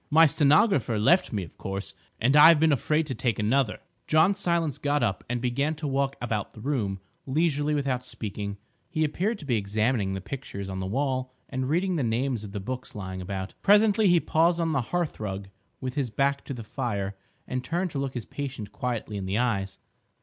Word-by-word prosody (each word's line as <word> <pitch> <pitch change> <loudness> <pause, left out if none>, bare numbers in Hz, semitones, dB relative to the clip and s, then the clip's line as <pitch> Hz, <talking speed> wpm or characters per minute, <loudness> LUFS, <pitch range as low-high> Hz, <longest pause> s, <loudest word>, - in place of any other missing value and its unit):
My 160 +1 +7
stenographer 145 - +3
left 170 - +4
me 100 -3 -2
of 85 - -12
course—and 100 +6 -2
I've 150 +1 +9
been 160 0 +4
afraid 150 +4 +1
to 140 - -3
take 115 -2 -1
another—" 110 +1 +1 0.3
John 160 +5 +5
Silence 170 -6 0
got 145 -2 +1
up 105 -5 -1
and 125 0 -1
began 135 +6 0
to 155 0 -6
walk 140 0 0
about 110 -4 -3
the - - -12
room 110 -7 -1 0.3
leisurely 150 0 +1
without 135 -3 -1
speaking; 105 -4 -5 0.3
he 160 -2 0
appeared 190 +9 0
to 155 - -11
be 120 -5 +1
examining 105 0 0
the - - -3
pictures 100 -2 -6
on 95 0 -4
the 95 - -3
wall 130 +3 -1 0.2
and 130 0 -2
reading 180 +3 +1
the - - 0
names 120 0 0
of 105 - -8
the 100 - -4
books 125 +6 -6
lying 95 -2 -5
about. 95 +1 -5
Presently 210 +1 +5
he 175 -1 +5
paused 165 +2 +2
on 165 -1 +1
the 140 -4 +1
hearthrug, 105 - -3 0.3
with 130 -1 -4
his 135 -3 -1
back 140 +5 0
to - - -4
the 115 - -7
fire, 105 -5 -3 0.3
and 130 0 -3
turned 175 +4 -1
to 140 - -3
look 135 -1 -3
his 120 - -4
patient 135 -7 -6
quietly 120 -5 -3
in 95 -1 -4
the 95 +3 0
eyes. 105 -6 0
130 Hz, 200 wpm, -27 LUFS, 105-150 Hz, 0.3 s, I've